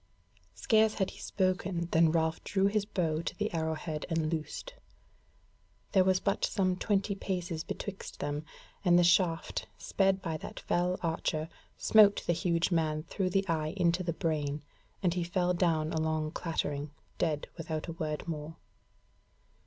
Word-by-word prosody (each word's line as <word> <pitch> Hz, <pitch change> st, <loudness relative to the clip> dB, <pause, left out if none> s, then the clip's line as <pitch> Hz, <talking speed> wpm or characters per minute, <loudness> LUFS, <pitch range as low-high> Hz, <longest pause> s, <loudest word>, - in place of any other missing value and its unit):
Scarce 215 Hz, -, +3 dB
had 190 Hz, -2 st, 0 dB
he -, -, -13 dB
spoken 185 Hz, -2 st, -1 dB
than 160 Hz, 0 st, +5 dB
Ralph 160 Hz, -1 st, 0 dB
drew 195 Hz, -1 st, +1 dB
his 205 Hz, 0 st, +2 dB
bow 165 Hz, -6 st, 0 dB
to 165 Hz, -, -5 dB
the 210 Hz, -1 st, -2 dB
arrow 160 Hz, -1 st, 0 dB
head 155 Hz, -1 st, -5 dB
and 165 Hz, -1 st, 0 dB
loosed; 165 Hz, -, -4 dB, 1.2 s
there 190 Hz, -, +5 dB
was 185 Hz, 0 st, +3 dB
but 200 Hz, 0 st, 0 dB
some 185 Hz, -2 st, +2 dB
twenty 200 Hz, +1 st, 0 dB
paces 180 Hz, -4 st, -3 dB
betwixt 200 Hz, -2 st, -6 dB
them, 145 Hz, +1 st, -2 dB, 0.4 s
and 175 Hz, -2 st, +5 dB
the 175 Hz, -, +6 dB
shaft, 170 Hz, -1 st, +2 dB
sped 195 Hz, -1 st, +1 dB
by 165 Hz, -4 st, -3 dB
that -, -, -8 dB
fell 180 Hz, +1 st, +1 dB
archer, 160 Hz, -1 st, -1 dB, 0.3 s
smote 210 Hz, -2 st, +6 dB
the 175 Hz, -, +2 dB
huge 170 Hz, 0 st, +1 dB
man 155 Hz, -2 st, +1 dB
through 185 Hz, +2 st, -1 dB
the 195 Hz, +1 st, +1 dB
eye 155 Hz, 0 st, -1 dB
into 175 Hz, 0 st, +2 dB
the 170 Hz, -2 st, -1 dB
brain, 150 Hz, -3 st, -1 dB, 0.4 s
and 175 Hz, -2 st, +3 dB
he 180 Hz, -1 st, -1 dB
fell 180 Hz, +1 st, +1 dB
down 165 Hz, -3 st, +1 dB
along 155 Hz, -1 st, 0 dB
clattering, 150 Hz, -4 st, -2 dB, 0.3 s
dead 150 Hz, -2 st, 0 dB
without 160 Hz, -2 st, -4 dB
a -, -, -3 dB
word 155 Hz, 0 st, -4 dB
more. 155 Hz, -1 st, -5 dB
170 Hz, 160 wpm, -31 LUFS, 160-185 Hz, 1.2 s, the